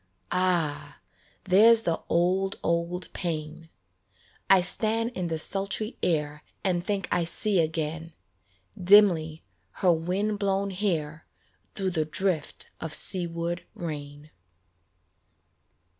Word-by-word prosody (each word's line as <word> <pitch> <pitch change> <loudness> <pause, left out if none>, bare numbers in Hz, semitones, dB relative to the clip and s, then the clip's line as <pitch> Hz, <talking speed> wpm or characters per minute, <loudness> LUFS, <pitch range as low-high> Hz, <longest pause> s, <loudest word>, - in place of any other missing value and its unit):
Ah! 175 -5 0 0.4
there's 220 +5 +6
the 165 -4 -1
old, 185 +3 +1
old 170 +1 -1
pain 160 -2 -4 0.8
I 190 -1 +7
stand 225 +5 0
in 185 -7 -3
the 165 -1 -2
sultry 200 +6 -2
air 150 -3 -1 0.2
And 180 -3 0
think 195 0 -2
I 175 -1 +2
see 190 +3 0
again, 160 0 -2 0.7
Dimly, 175 -5 +5 0.3
her 185 -3 +3
wind 190 +6 -1
blown 195 0 0
hair 165 -6 -2 0.5
Through 190 -2 -1
the 160 -3 0
drift 165 -1 -2
of 160 -1 -4
seaward 170 -2 0
rain. 150 -2 -7
175 Hz, 105 wpm, -27 LUFS, 160-195 Hz, 0.8 s, I